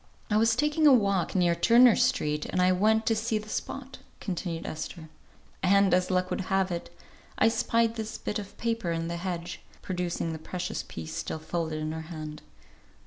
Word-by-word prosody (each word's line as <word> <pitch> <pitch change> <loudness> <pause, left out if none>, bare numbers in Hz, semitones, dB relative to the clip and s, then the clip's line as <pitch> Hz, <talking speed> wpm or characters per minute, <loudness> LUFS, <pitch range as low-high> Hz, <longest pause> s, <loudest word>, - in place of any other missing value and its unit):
"I 210 - +4
was 225 +1 +4
taking 300 +3 +3
a 280 - +8
walk 200 -6 +1
near 175 -2 +3
Turner 235 +7 +6
Street, 150 0 +1
and - - -2
I 180 0 +4
went 220 +4 +3
to 225 - +2
see 220 0 0
the 215 0 -7
spot," 270 +3 -5 0.2
continued 175 -3 -4
Esther, 160 +1 -6 0.5
"and, 200 +1 +4
as 180 0 +2
luck 185 0 0
would - - -1
have 190 -1 +1
it, 170 -1 -4 0.5
I 225 - +5
spied 230 0 +1
this 220 +1 -4
bit 210 - -3
of 200 -1 -9
paper 230 -6 -1
in 165 0 -2
the 170 - -3
hedge," 175 -1 -4 0.2
producing 175 -3 -2
the 160 - -6
precious 180 +3 -4
piece 80 -1 -8
still 160 - -3
folded 160 0 -3
in 155 0 -3
her 160 0 -4
hand. 155 -2 -7
185 Hz, 190 wpm, -28 LUFS, 170-220 Hz, 0.5 s, a